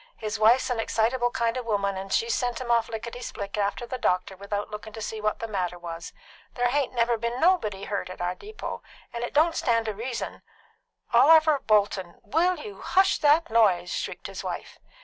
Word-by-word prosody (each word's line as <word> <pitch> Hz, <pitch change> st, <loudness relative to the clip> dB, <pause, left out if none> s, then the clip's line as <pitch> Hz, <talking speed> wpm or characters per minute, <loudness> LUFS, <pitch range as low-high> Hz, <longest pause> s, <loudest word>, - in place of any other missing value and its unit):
His 215 Hz, 0 st, -4 dB
wife's 245 Hz, +4 st, +4 dB
an 240 Hz, -, -1 dB
excitable 240 Hz, +2 st, +1 dB
kind 235 Hz, 0 st, -1 dB
of 250 Hz, -2 st, -5 dB
a -, -, -5 dB
woman, 200 Hz, -2 st, 0 dB
and 190 Hz, +1 st, -6 dB
she's 230 Hz, +3 st, +1 dB
sent 245 Hz, -1 st, -1 dB
him 245 Hz, -2 st, -3 dB
off 230 Hz, -1 st, +2 dB
lickety 235 Hz, +2 st, -6 dB
split 200 Hz, -4 st, -5 dB
after 205 Hz, +3 st, -1 dB
the 255 Hz, +1 st, -5 dB
doctor 185 Hz, 0 st, 0 dB
without 205 Hz, +2 st, -4 dB
looking 210 Hz, +1 st, -8 dB
to 225 Hz, -, -7 dB
see 220 Hz, 0 st, -5 dB
what 215 Hz, 0 st, 0 dB
the 230 Hz, -, -5 dB
matter 180 Hz, -4 st, -2 dB
was. 170 Hz, -1 st, -7 dB, 0.4 s
There 245 Hz, 0 st, +2 dB
hain't 275 Hz, -1 st, 0 dB
never 235 Hz, -1 st, +2 dB
been 235 Hz, +1 st, -2 dB
anybody 250 Hz, -, +2 dB
hurt 200 Hz, -2 st, -3 dB
at 185 Hz, -, -9 dB
our 175 Hz, 0 st, -1 dB
depot, 425 Hz, -, -7 dB, 0.3 s
and 235 Hz, 0 st, -4 dB
it 240 Hz, -, -3 dB
don't 320 Hz, +4 st, +3 dB
stand 230 Hz, -2 st, +1 dB
to 215 Hz, -, -2 dB
reason 235 Hz, +4 st, -5 dB, 0.4 s
" -, -, -33 dB
"Oliver 315 Hz, -2 st, +6 dB
Bolton, 200 Hz, -6 st, +1 dB
will 340 Hz, -, +2 dB
you 425 Hz, -3 st, -9 dB
hush 385 Hz, +1 st, +3 dB
that 300 Hz, -2 st, +4 dB
noise?" 190 Hz, -6 st, +3 dB
shrieked -, -, -4 dB
his -, -, -6 dB
wife. -, -, -6 dB
230 Hz, 210 wpm, -26 LUFS, 205-255 Hz, 0.4 s, Oliver